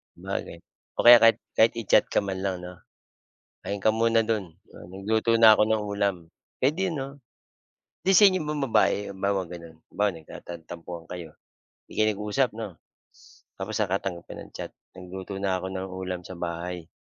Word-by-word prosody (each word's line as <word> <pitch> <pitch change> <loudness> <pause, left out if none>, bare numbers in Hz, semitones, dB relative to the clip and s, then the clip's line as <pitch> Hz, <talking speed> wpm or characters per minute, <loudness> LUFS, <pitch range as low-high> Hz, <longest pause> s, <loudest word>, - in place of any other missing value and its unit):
Sabagay, - - -5 0.4
o - - +1
kaya 120 0 +12
kahit 115 0 +7 0.2
kahit 115 +1 +5
i-chat 110 - +4
ka - - +4
man 95 -1 -3
lang 95 -1 0
'no? 90 0 -7 0.9
"Kain 100 0 -3
ka - - +7
muna 115 0 +4
do'n, 110 -3 0 0.5
nagluto 110 +4 0
na 115 -1 +8
ako - - +4
ng 110 -1 +1
ulam." 100 -1 +1 0.4
Puwede 155 +9 +1
'no? 135 -2 -3 1.0
'Di 190 - +3
sa 205 - +8
inyo 185 -1 0
bang 150 -1 -2
babae, 100 -3 +4
halimbawa 100 0 -1
gano'n, 85 -2 -10
halimbawa 105 0 0
nagtantan 80 +1 -10
tampuhan 85 0 -8
kayo, 90 -2 -7 0.6
'di - - -15
kayo 110 - +4
nag-usap 105 +5 0
'no? 110 -1 -5 0.9
Tapos 100 +3 -5
nakatanggap 95 -4 -1
ka - - -6
ng - - -12
chat, - - -6 0.2
"Nagluto 95 +1 -8
na 95 -2 0
ko 95 - -4
ng 95 0 -4
ulam 90 -1 -4
sa 90 0 -9
bahay." 85 0 -5
100 Hz, 170 wpm, -26 LUFS, 90-110 Hz, 1.0 s, kaya